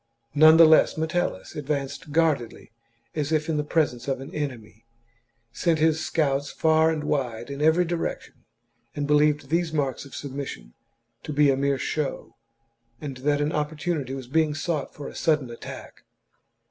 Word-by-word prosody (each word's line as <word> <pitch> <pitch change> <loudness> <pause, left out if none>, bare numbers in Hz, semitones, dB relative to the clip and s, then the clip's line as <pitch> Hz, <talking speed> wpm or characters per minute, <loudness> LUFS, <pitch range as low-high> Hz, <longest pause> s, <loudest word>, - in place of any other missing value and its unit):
None 155 +2 +7
the 165 - +9
less 160 0 +5
Metellus 160 - -2
advanced 145 0 -4
guardedly 150 -10 0 0.4
as 150 -1 -2
if 155 -1 +1
in 160 -2 0
the 150 - 0
presence 145 -6 0
of 135 -2 -1
an 135 +4 -9
enemy, 120 -7 -6 0.7
sent 170 -2 +1
his 160 0 +2
scouts 140 -2 0
far 160 0 +3
and 155 -2 -2
wide 130 -4 -2
in 140 +1 -5
every 160 +3 +4
direction, 170 0 -3 0.6
and 145 - -2
believed 150 -1 +2
these 170 0 +1
marks 140 -5 -1
of 140 - -14
submis 140 -1 -5
sion - - -9 0.5
to 150 - -6
be 145 -1 +4
a - - +2
mere 140 0 +1
show, 150 +1 -3 0.6
and 140 -4 -6
that 145 +2 0
an 145 +1 0
opportunity 150 -3 -2
was 135 -2 -7
being 155 +2 +1
sought 155 -2 -2
for 145 - -8
a - - -9
sudden 150 -6 0
attack. 115 - -10
150 Hz, 165 wpm, -25 LUFS, 135-160 Hz, 0.7 s, the